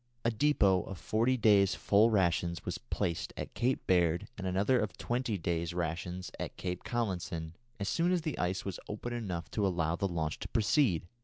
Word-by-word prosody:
A 115 - +4
depôt 105 -8 +3
of 95 - -6
forty 115 +7 +1
days' 100 -4 +5
full 105 +3 +4
rations 85 -4 +1
was 90 +1 -3
placed 95 -8 -2
at - - -5
Cape 125 +2 0
Baird 85 -2 +2
and 95 -1 -4
another 100 +8 +2
of 100 -4 -2
twenty 120 -3 -1
days' 85 0 -2
rations 90 +2 -3
at - - -5
Cape 90 -1 -4
Collinson, 90 -8 -2 0.3
as 100 - -2
soon 170 +7 +2
as 180 -2 +2
the 155 - -3
ice 90 +1 -1
was 95 -3 -4
open 115 +3 -4
enough 95 -8 -4
to 105 -2 +1
allow 85 -3 0
the 100 - 0
launch 80 -4 -2
to - - -5
proceed. 115 - +2
95 Hz, 185 wpm, -32 LUFS, 85-115 Hz, 0.3 s, days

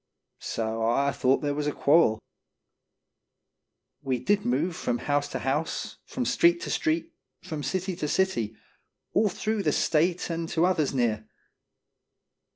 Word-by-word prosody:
So 115 0 -3
I 140 +4 +2
thought 130 0 +2
there 145 -1 0
was 150 0 -2
a - - +1
quarrel; 145 -7 +4 1.8
We 135 -3 -1
did 205 +10 +1
move 155 +8 0
from 250 +5 -1
house 145 -8 0
to - - -4
house, 145 +5 -2
from - - -3
street 340 0 +4
to - - -4
street, 330 +1 0 0.3
from 155 -2 -5
city 185 +6 -2
to 150 - -2
city, 130 - 0 0.6
all 210 - +3
through 215 +3 -2
the - - +1
State 170 +3 +1
and 165 0 -3
to 165 +1 +2
others 170 -6 +1
near. 115 -5 0
150 Hz, 145 wpm, -27 LUFS, 135-185 Hz, 1.8 s, quarrel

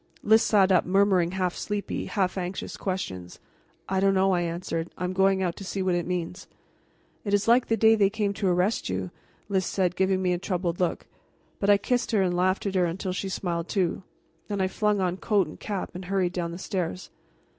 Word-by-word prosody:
Lys 220 +1 +5
sat 195 -3 +4
up, 185 - +5
murmuring 185 -2 +2
half 185 -2 0
sleepy, 205 -1 -3
half 190 -4 0
anxious 185 0 -4
questions. 95 - -4 0.5
"I 190 0 0
don't 195 0 +3
know," 190 0 +3
I 180 -2 +2
answered. 170 -1 -3
"I - - -4
am 180 +1 -1
going 190 0 +3
out 175 -2 -1
to - - -7
see 190 0 -3
what 185 -1 +1
it 175 -1 -1
means." 180 +1 -4 0.8
"It 205 -1 +1
is 205 - 0
like 240 +2 +4
the 225 - +1
day 220 +1 +6
they 205 -3 +4
came 205 -1 -1
to 200 -1 -1
arrest 180 - +1
you," 95 0 -3 0.4
Lys 195 -2 +1
said, 180 -2 0
giving 190 0 +2
me 180 -1 +1
a 175 - -2
troubled 180 -2 -2
look. 180 -2 -1 0.5
But 200 - 0
I 205 - +7
kissed 245 +4 -1
her 210 - +4
and 180 -1 0
laughed 185 +3 +1
at 200 - -1
her 185 -2 +3
until 180 +2 -3
she 190 +1 -3
smiled 175 -3 -3
too. 185 -3 0 0.5
Then 205 -1 -3
I 190 - +2
flung 210 +1 0
on 180 -1 0
coat 205 -2 +2
and 155 - -11
cap 200 -3 -4
and 180 +1 -7
hurried 185 -1 0
down 175 -2 -2
the 170 - -6
stairs. 180 - -4
190 Hz, 220 wpm, -26 LUFS, 175-200 Hz, 0.8 s, I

